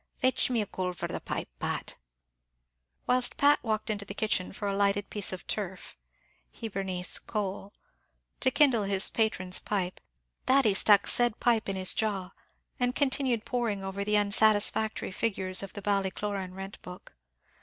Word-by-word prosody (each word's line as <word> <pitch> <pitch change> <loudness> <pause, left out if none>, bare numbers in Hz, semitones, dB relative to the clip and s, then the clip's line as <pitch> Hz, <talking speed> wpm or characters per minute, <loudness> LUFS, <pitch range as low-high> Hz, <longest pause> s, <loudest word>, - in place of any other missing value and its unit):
Fetch 255 0 +2
me 235 -4 +1
a - - -6
coal 185 -2 -3
for 175 - -4
the - - -4
pipe, - - -4
Pat." - - -3 1.1
Whilst 250 0 +1
Pat 290 +1 +5
walked 220 -1 -1
into 205 -1 -3
the 200 0 -8
kitchen 205 -4 -1
for 205 +1 -5
a 200 - -1
lighted 200 0 +1
piece 205 -2 0
of 185 -1 -7
turf 190 -3 -5 0.6
(Hibernice, 190 -5 0
coal) 200 -2 -4 0.7
to 260 - +3
kindle 260 -6 +3
his 195 0 +4
patron's 185 -5 +1
pipe, 185 -3 -3 0.5
Thady 260 -6 +4
stuck 200 +1 +5
the - - -6
said 240 -2 +1
pipe 230 -4 +2
in 195 - -1
his 185 -1 +1
jaw, 195 -4 -2 0.5
and 245 0 +1
continued 260 -5 +1
poring 230 -6 -2
over 195 +1 -3
the 210 +1 +2
unsatisfactory 210 +1 +2
figures 190 -2 -1
of 195 -1 -8
the 205 - -8
Ballycloran 195 -1 -2
rent 195 +1 -8
book. 180 0 -11
205 Hz, 160 wpm, -29 LUFS, 195-225 Hz, 1.1 s, Pat